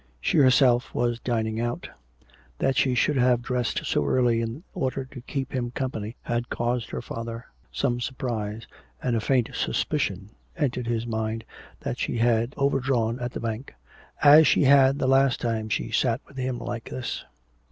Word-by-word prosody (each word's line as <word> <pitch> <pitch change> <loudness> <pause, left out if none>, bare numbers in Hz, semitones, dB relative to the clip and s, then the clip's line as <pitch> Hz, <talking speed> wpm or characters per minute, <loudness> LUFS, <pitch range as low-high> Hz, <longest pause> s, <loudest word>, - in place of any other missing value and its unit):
She - - +2
herself 130 -2 +4
was 120 -1 0
dining 110 -3 -1
out. 120 0 -3 0.7
That 135 - +1
she 135 -2 +2
should 145 +4 +2
have 125 -1 +3
dressed 125 -2 -1
so - - +1
early 115 - +2
in 115 +8 -5
order 135 -6 -2
to 130 -1 -11
keep 135 +2 -4
him 125 -2 -1
company 120 -3 -4
had 120 0 -2
caused 120 -1 -1
her - - -5
father 115 +1 -6 0.3
some 120 - -1
surprise, 115 -4 -3 0.4
and 120 - +1
a 110 - 0
faint 125 0 +1
suspicion 95 +2 -1 0.3
entered 125 -6 -1
his 115 -1 -1
mind 110 -1 -3 0.4
that - - -4
she - - -1
had 115 +2 +2
overdrawn 135 -4 +1
at 120 0 -3
the - - -4
bank, 115 +3 -5 0.5
as 150 +1 +9
she 140 - +4
had 135 0 +6
the 135 - -1
last 135 0 +4
time 110 -2 -2
she - - -2
sat 120 -1 +1
with 140 - -18
him 130 -1 -2
like 120 -1 -5
this. 130 -2 -4
120 Hz, 170 wpm, -26 LUFS, 115-130 Hz, 0.7 s, as